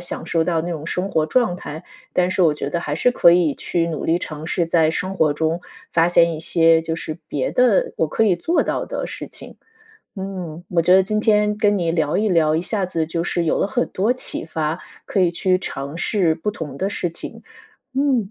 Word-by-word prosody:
享 175 Hz, -, 0 dB
受 165 Hz, -1 st, +1 dB
到 165 Hz, -1 st, 0 dB
那 175 Hz, -, -4 dB
种 155 Hz, -2 st, -5 dB
生 180 Hz, +3 st, -2 dB
活 155 Hz, -1 st, +1 dB
状 225 Hz, +1 st, +2 dB
态。 160 Hz, -1 st, -8 dB, 0.3 s
但 180 Hz, 0 st, +2 dB
是 185 Hz, -, -1 dB
我 160 Hz, -4 st, +4 dB
觉 145 Hz, -, -4 dB
得 170 Hz, -, -1 dB
还 145 Hz, -3 st, -3 dB
是 250 Hz, -, +2 dB
可 170 Hz, -8 st, +5 dB
以 170 Hz, -4 st, +3 dB
去 170 Hz, -1 st, -1 dB
努 155 Hz, -3 st, -4 dB
力 165 Hz, +2 st, +2 dB
尝 155 Hz, -1 st, -6 dB
试， 170 Hz, 0 st, 0 dB
在 165 Hz, -1 st, +3 dB
生 185 Hz, +3 st, -3 dB
活 160 Hz, -5 st, +3 dB
中 160 Hz, +2 st, -1 dB, 0.3 s
发 165 Hz, +1 st, +4 dB
现 170 Hz, -1 st, +4 dB
一 155 Hz, -, -6 dB
些 165 Hz, -1 st, +4 dB
就 165 Hz, 0 st, -3 dB
是 155 Hz, 0 st, -6 dB
别 135 Hz, -3 st, -1 dB
的 245 Hz, -6 st, +3 dB
我 160 Hz, -, +1 dB
可 225 Hz, -, +1 dB
以 195 Hz, -4 st, +4 dB
做 330 Hz, -, +1 dB
到 -, -, -2 dB
的 -, -, -4 dB
事 -, -, -7 dB
情。 -, -, -8 dB, 0.6 s
嗯， 185 Hz, -4 st, -6 dB
我 175 Hz, -, +1 dB
觉 180 Hz, +2 st, +4 dB
得 190 Hz, -, +7 dB
今 215 Hz, +3 st, -1 dB
天 210 Hz, -1 st, +2 dB
跟 205 Hz, -1 st, +3 dB
你 175 Hz, -4 st, 0 dB
聊 155 Hz, -3 st, 0 dB
一 215 Hz, 0 st, +1 dB
聊， 160 Hz, -3 st, +3 dB
一 165 Hz, -, 0 dB
下 195 Hz, +1 st, -1 dB
子 165 Hz, -3 st, -2 dB
就 165 Hz, 0 st, -2 dB
是 175 Hz, -1 st, -1 dB
有 -, -, +1 dB
了 -, -, +1 dB
很 245 Hz, 0 st, 0 dB
多 210 Hz, +6 st, +1 dB
启 255 Hz, -, -4 dB
发， 155 Hz, 0 st, -2 dB, 0.3 s
可 195 Hz, -, 0 dB
以 175 Hz, -2 st, +3 dB
去 185 Hz, +1 st, +1 dB
尝 140 Hz, -3 st, -6 dB
试 175 Hz, -5 st, +1 dB
不 210 Hz, +6 st, -3 dB
同 150 Hz, -8 st, -7 dB
的 190 Hz, -, -1 dB
事 180 Hz, -3 st, -2 dB
情。 165 Hz, -, -8 dB, 0.5 s
嗯， 260 Hz, -7 st, +1 dB
170 Hz, 250 characters per minute, -21 LUFS, 160-195 Hz, 0.6 s, 得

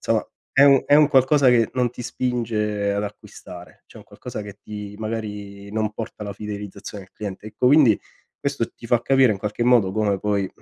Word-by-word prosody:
insomma -, -, 0 dB, 0.2 s
è 135 Hz, -, +5 dB
un 140 Hz, -2 st, +6 dB
è -, -, +5 dB
un 150 Hz, 0 st, +6 dB
qualcosa 135 Hz, 0 st, +4 dB
che 115 Hz, -3 st, +4 dB
non 125 Hz, -2 st, +1 dB
ti 125 Hz, -, -8 dB
spinge 110 Hz, -5 st, -1 dB
ad 100 Hz, 0 st, -1 dB
acquistare, 90 Hz, -3 st, -10 dB
cioè -, -, -17 dB
è -, -, -9 dB
un -, -, -14 dB
qualcosa 105 Hz, -, -8 dB
che 100 Hz, 0 st, -10 dB
ti 105 Hz, -1 st, -8 dB
magari 105 Hz, -2 st, -6 dB
non 110 Hz, -1 st, -1 dB
porta 110 Hz, -1 st, -7 dB
la 100 Hz, -1 st, -5 dB
fidelizzazione 105 Hz, 0 st, -7 dB
al 95 Hz, -, -25 dB
cliente. 105 Hz, 0 st, -7 dB
Ecco, 110 Hz, +3 st, -1 dB
quindi, 130 Hz, -6 st, +6 dB, 0.4 s
questo 140 Hz, -4 st, -1 dB
ti 115 Hz, -, -12 dB
fa 120 Hz, 0 st, +2 dB
capire 135 Hz, -4 st, +4 dB
in 95 Hz, -, -5 dB
qualche 105 Hz, +4 st, -2 dB
modo 120 Hz, -6 st, +4 dB
come 100 Hz, -1 st, 0 dB
poi 100 Hz, -2 st, 0 dB
110 Hz, 205 wpm, -22 LUFS, 100-125 Hz, 0.4 s, un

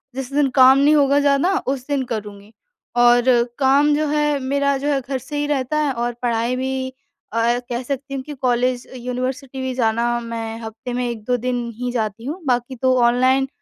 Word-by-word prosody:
जिस 270 Hz, 0 st, -5 dB
दिन 290 Hz, -1 st, +3 dB
काम 260 Hz, 0 st, +7 dB
नहीं 295 Hz, +2 st, +4 dB
होगा 280 Hz, -1 st, +4 dB
ज़्यादा, 285 Hz, +5 st, +2 dB, 0.2 s
उस 265 Hz, -2 st, -2 dB
दिन 285 Hz, -2 st, 0 dB
करूँगी। 210 Hz, -2 st, -6 dB, 0.5 s
और 240 Hz, 0 st, +5 dB, 0.4 s
काम 280 Hz, +2 st, +4 dB
जो 305 Hz, 0 st, 0 dB
है 295 Hz, -1 st, +1 dB
मेरा 280 Hz, +1 st, 0 dB
जो 285 Hz, +2 st, -4 dB
है, 280 Hz, -2 st, +2 dB
घर 265 Hz, +1 st, -3 dB
से 280 Hz, +4 st, -7 dB
ही 290 Hz, -, 0 dB
रहता 290 Hz, 0 st, -1 dB
है 300 Hz, -2 st, +1 dB
और 240 Hz, 0 st, -2 dB
पढ़ाई 235 Hz, +1 st, 0 dB
भी 260 Hz, 0 st, -2 dB, 0.4 s
अ, 235 Hz, +1 st, +2 dB
कह 245 Hz, +1 st, -3 dB
सकती 275 Hz, +1 st, -5 dB
हूँ 265 Hz, -1 st, -4 dB
कि 295 Hz, -, -8 dB
कॉलेज, 250 Hz, -1 st, 0 dB
यूनिवर्सिटी 255 Hz, +2 st, -4 dB
भी 260 Hz, -1 st, -2 dB
जाना, 235 Hz, 0 st, +1 dB
मैं 230 Hz, -1 st, -5 dB
हफ्ते 225 Hz, +3 st, -7 dB
में 245 Hz, 0 st, -1 dB
1-2 235 Hz, +2 st, -2 dB
दिन 245 Hz, 0 st, -2 dB
ही 250 Hz, +2 st, -3 dB
जाती 225 Hz, -1 st, -3 dB
हूँ 310 Hz, +7 st, -4 dB
बाक़ी 245 Hz, +1 st, 0 dB
तो 255 Hz, +1 st, +2 dB
ऑनलाइन 255 Hz, +3 st, +3 dB
255 Hz, 195 wpm, -20 LUFS, 240-275 Hz, 0.5 s, काम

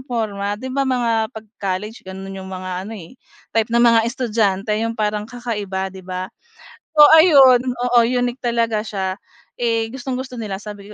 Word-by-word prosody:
porma. 205 Hz, -4 st, -2 dB
'Di 260 Hz, +3 st, -7 dB
ba, 275 Hz, 0 st, 0 dB
mga 230 Hz, -3 st, +1 dB
pag-college 210 Hz, -1 st, -6 dB
gano'n 190 Hz, +1 st, -7 dB
yung 190 Hz, -, -9 dB
mga 185 Hz, +1 st, -5 dB
ano, 225 Hz, -, -7 dB
eh, 185 Hz, +7 st, -13 dB, 0.3 s
type 225 Hz, 0 st, +1 dB
ng 235 Hz, +1 st, +3 dB
mga 230 Hz, -1 st, +6 dB
estudyante 215 Hz, -5 st, 0 dB
yung 230 Hz, +1 st, -2 dB
parang 210 Hz, 0 st, -2 dB
kakaiba, 205 Hz, -6 st, -4 dB
'di 190 Hz, -, -10 dB
ba? 185 Hz, 0 st, -6 dB, 0.7 s
So, 295 Hz, -, +11 dB
ayun 275 Hz, -7 st, +7 dB
oo 245 Hz, -1 st, 0 dB
unique 245 Hz, +1 st, -1 dB
talaga 230 Hz, -2 st, 0 dB
siya. 190 Hz, -3 st, -3 dB, 0.4 s
Eh, 230 Hz, -1 st, 0 dB
gustong-gusto 255 Hz, -1 st, -5 dB
nila 205 Hz, -3 st, -4 dB
sabi 205 Hz, 0 st, -9 dB
225 Hz, 160 wpm, -20 LUFS, 200-245 Hz, 0.7 s, So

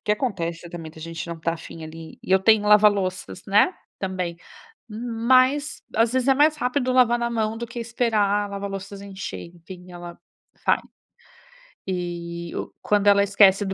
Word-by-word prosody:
O -, -, -77 dB
que 210 Hz, -, +2 dB
acontece, 175 Hz, -7 st, -3 dB
também, 165 Hz, -2 st, -7 dB
da 160 Hz, -, -13 dB
gente 165 Hz, +1 st, -6 dB
não 170 Hz, -, -5 dB
estar 165 Hz, +1 st, -2 dB
afim 165 Hz, 0 st, -10 dB
ali, 160 Hz, +1 st, -10 dB
e -, -, -10 dB
eu 190 Hz, -, +6 dB
tenho 215 Hz, +1 st, +4 dB
lava-louças, 200 Hz, -3 st, +3 dB
né, 210 Hz, -, +4 dB, 0.2 s
também. 185 Hz, -3 st, -3 dB, 0.6 s
Mas 255 Hz, +6 st, +1 dB
às 225 Hz, +1 st, +3 dB
vezes 260 Hz, 0 st, +1 dB
é 270 Hz, -, +6 dB
mais 300 Hz, +2 st, +4 dB
rápido 255 Hz, -1 st, 0 dB
lavar 240 Hz, -2 st, +4 dB
na 235 Hz, -, -1 dB
mão 220 Hz, -1 st, -1 dB
do 235 Hz, +1 st, -5 dB
que 235 Hz, -, -10 dB
esperar 230 Hz, -2 st, 0 dB, 0.2 s
a -, -, -6 dB
lava-louças 200 Hz, 0 st, -6 dB
encher, 195 Hz, -3 st, -7 dB
enfim, 180 Hz, +1 st, -12 dB
ela 175 Hz, -1 st, -9 dB, 0.5 s
vai. -, -, +4 dB, 1.1 s
E 170 Hz, -2 st, -4 dB
o -, -, -5 dB
quando 205 Hz, -1 st, +1 dB
ela 200 Hz, 0 st, +6 dB
esquece 200 Hz, 0 st, +5 dB
do 190 Hz, -, -3 dB
200 Hz, 175 wpm, -23 LUFS, 175-235 Hz, 1.1 s, eu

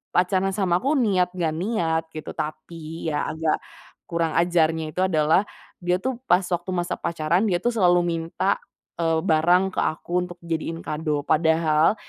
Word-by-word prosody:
pacaran 185 Hz, +1 st, +2 dB
sama 180 Hz, -4 st, +2 dB
aku 275 Hz, +7 st, +1 dB
niat 200 Hz, -9 st, +2 dB
gak 165 Hz, -3 st, 0 dB
niat 170 Hz, -5 st, 0 dB
gitu, 155 Hz, -, -6 dB
tapi 155 Hz, +1 st, -5 dB
ya 150 Hz, -, -1 dB
agak 160 Hz, -1 st, 0 dB, 0.5 s
kurang 170 Hz, -1 st, 0 dB
ajarnya 160 Hz, -2 st, +1 dB
itu 185 Hz, -, +1 dB
adalah 160 Hz, 0 st, +3 dB, 0.4 s
dia 180 Hz, +1 st, +1 dB
tuh 255 Hz, +2 st, -3 dB
pas 180 Hz, -8 st, +4 dB
waktu 175 Hz, +1 st, -2 dB
masa 175 Hz, -1 st, -1 dB
pacaran, 165 Hz, +3 st, 0 dB
dia 175 Hz, -, +2 dB
tuh 240 Hz, -, 0 dB
selalu 180 Hz, -4 st, +4 dB
minta, 170 Hz, +3 st, -1 dB, 0.4 s
eee, 165 Hz, -1 st, +2 dB
barang 175 Hz, +3 st, +4 dB
ke -, -, +1 dB
aku 160 Hz, +2 st, -3 dB, 0.2 s
untuk 175 Hz, -, -11 dB
dijadiin 165 Hz, 0 st, -3 dB
kado. 150 Hz, -2 st, -2 dB
Padahal 160 Hz, +2 st, +3 dB
170 Hz, 160 wpm, -24 LUFS, 160-185 Hz, 0.5 s, pas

